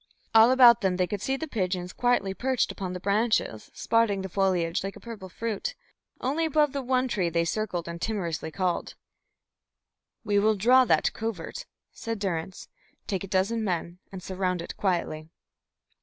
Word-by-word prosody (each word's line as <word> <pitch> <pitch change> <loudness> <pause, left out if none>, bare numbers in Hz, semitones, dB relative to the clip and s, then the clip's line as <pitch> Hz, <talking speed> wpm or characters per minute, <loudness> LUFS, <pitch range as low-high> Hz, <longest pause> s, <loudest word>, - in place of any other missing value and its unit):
All 225 +1 +8
about 245 -3 +7
them 190 -3 +1
they 180 - +2
could 200 +2 -4
see 270 +4 -1
the 320 - -5
pigeons 185 - -2
quietly 245 -6 +1
perched 255 +4 0
upon 185 -3 -5
the 180 - -5
branches, 200 - 0
spotting 220 -4 +1
the 190 - -5
foliage 180 -3 0
like 195 0 -5
a - - -11
purple 220 -5 -9
fruit. 230 - -4 0.4
Only 290 +6 -1
above 300 -2 +2
the 280 - -2
one 255 0 +1
tree 190 -8 0
they 170 0 +1
circled 180 -3 -2
and 170 0 -6
timorously 175 -8 -2
called. 180 +1 -2 1.3
"We 205 -2 +2
will 215 +1 +3
draw 250 +6 +5
that - - +2
covert," 225 - -5 0.2
said 230 0 -5
Durrance. 185 -3 -4 0.4
"Take 190 -2 -2
a - - -6
dozen 200 +4 0
men 175 -2 -3
and 190 -2 -8
surround 185 -1 -2
it - - -8
quietly." 170 -5 -2
200 Hz, 170 wpm, -27 LUFS, 180-230 Hz, 1.3 s, All